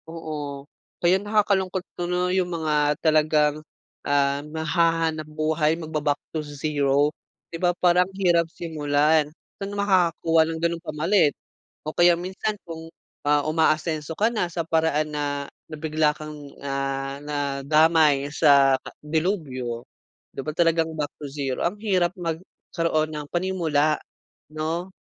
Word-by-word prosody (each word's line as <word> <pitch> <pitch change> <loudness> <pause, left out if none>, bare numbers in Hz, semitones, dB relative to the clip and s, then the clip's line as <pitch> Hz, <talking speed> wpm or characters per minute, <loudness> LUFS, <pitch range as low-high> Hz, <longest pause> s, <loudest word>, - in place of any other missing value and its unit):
Oo. 150 -4 -6 0.4
Kaya 180 +2 +3
nakakalungkot 195 -3 +1
tuloy 180 +1 -1
yung 180 - -3
mga 150 -2 +1
talagang, 155 -1 +3 0.4
ah, 140 0 +2
naghahanap-buhay, 160 -1 0
magba-back 155 -3 -1 0.2
to 160 - -1
zero. 145 0 0 0.4
'Di 165 - -6
ba, 175 -1 +3
parang 180 +1 +3
hirap 170 -3 +3
simulan. 150 -2 +1 0.3
Saan 200 +1 -4
makakakuha 175 -5 +3
ng 165 - -3
gano'ng 170 0 0
pamalit? 160 0 +2 0.5
O 155 - -4
kaya 175 0 +5
minsan 190 +4 -3
kung, 165 -1 -8 0.4
ah, 145 0 +3
umaasenso 155 0 +1
ka 220 +2 +3
na 180 -6 -1
sa 170 -1 -3
paraan 160 -2 +1
na 145 0 -1 0.4
na 155 - -6
bigla 155 -1 +1
kang, 155 0 -8 0.3
ah, 135 0 -3
nadamay 145 +1 +2
sa 140 -2 +5 0.3
delubyo. 150 - -2 0.5
'Di - - -4
ba 155 - -2
talagang 165 0 +2
back 150 -1 -1
to 145 - -5
zero. 135 -2 -3
Ang 180 +5 -1
hirap 185 -5 +1
magkaroon 165 -2 -2
ng 150 -1 -5
panimula, 165 -5 +1 0.6
no. 165 +4 -3
155 Hz, 125 wpm, -24 LUFS, 150-170 Hz, 0.6 s, kaya